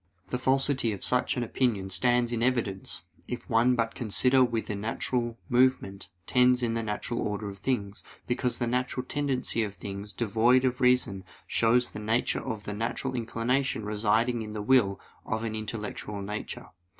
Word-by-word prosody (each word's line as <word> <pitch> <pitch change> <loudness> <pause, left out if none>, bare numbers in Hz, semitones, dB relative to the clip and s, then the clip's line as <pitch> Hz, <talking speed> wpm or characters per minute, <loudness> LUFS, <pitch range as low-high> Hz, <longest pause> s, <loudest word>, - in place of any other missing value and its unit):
The 125 - -2
falsity 130 -3 +2
of 100 - -7
such 125 0 +2
an 125 - 0
opinion 110 -5 0
stands 120 +5 +2
in 115 - -1
evidence, 115 -6 -1 0.2
if - - -5
one 120 +3 +4
but 115 -1 0
consider 125 +3 +3
whither 115 -3 -1
natural 115 +3 -2
movement 120 -6 +2 0.2
tends 125 0 +4
in 115 -1 +1
the 115 - 0
natural 110 +2 -3
order 105 0 -2
of 100 0 -9
things; 100 -4 -2 0.2
because 125 0 0
the 120 - 0
natural 125 +1 -1
tendency 135 -5 -1
of 105 -2 -3
things 100 +1 -6
devoid 120 +3 +3
of 130 +1 0
reason 125 -7 +3 0.2
shows 120 +2 +2
the - - -7
nature 110 +3 0
of 110 -2 -5
the 105 - -4
natural 115 +5 -2
inclination 120 0 -1
residing 110 +3 +1
in 105 -1 -6
the 105 -1 -4
will 105 -5 +3 0.2
of 110 0 -2
an 110 -1 -2
intellectual 105 -2 -5
nature. 105 +2 -5
115 Hz, 165 wpm, -28 LUFS, 105-125 Hz, 0.2 s, one